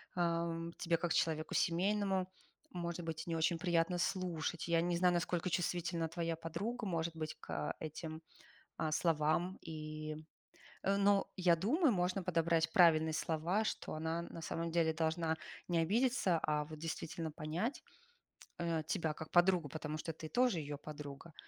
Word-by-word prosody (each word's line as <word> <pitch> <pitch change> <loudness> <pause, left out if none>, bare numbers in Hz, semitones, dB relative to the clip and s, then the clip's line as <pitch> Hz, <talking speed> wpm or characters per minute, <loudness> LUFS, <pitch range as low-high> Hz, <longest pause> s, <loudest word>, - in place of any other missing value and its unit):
тебе, 170 0 0
э, - - +1
м, - - -18
как 175 -2 +1
человеку 155 -1 +1
семейному, 190 +2 +2 0.4
может 170 -2 -3
быть, 160 0 -4
не 165 - -1
очень 165 +1 +2
приятно 175 0 +2
слушать. 170 -3 -1
Я 165 -1 +3
не 175 0 +1
знаю, 180 0 +4
насколько 175 0 0
чувствительна 175 -1 0
твоя 165 0 -1
подруга, 210 +9 -4
может 170 -3 -1
быть, 155 -1 -4
к - - -3
этим, 155 +1 -6 0.6
э, 160 -1 0
словам, 165 +3 +2
и. 155 -1 -5 0.7
Но 200 0 +3
я 175 -3 +4
думаю, 270 - +3
можно 185 0 0
подобрать 165 -2 +2
правильно 160 -3 +6
слова, 165 +7 0
что - - -3
она 160 +2 -1
на 170 -1 -8
самом 165 +1 -2
деле 165 -1 +3
должна 160 0 0 0.3
не 175 -1 +2
обидеться, 205 +1 +3
а 150 -1 +1
вот, 155 0 -8
действительно 160 0 -4
понять, 165 - -2 0.8
э, 170 -2 0
тебя 160 -2 0
как 160 +1 -8
подругу, 175 -2 +4
потому 155 +1 -4
что 165 +1 -4
ты 160 0 -8
тоже 245 -5 +3
её 145 -1 -4
подруга, 150 +1 -8
165 Hz, 155 wpm, -36 LUFS, 160-180 Hz, 0.8 s, правильно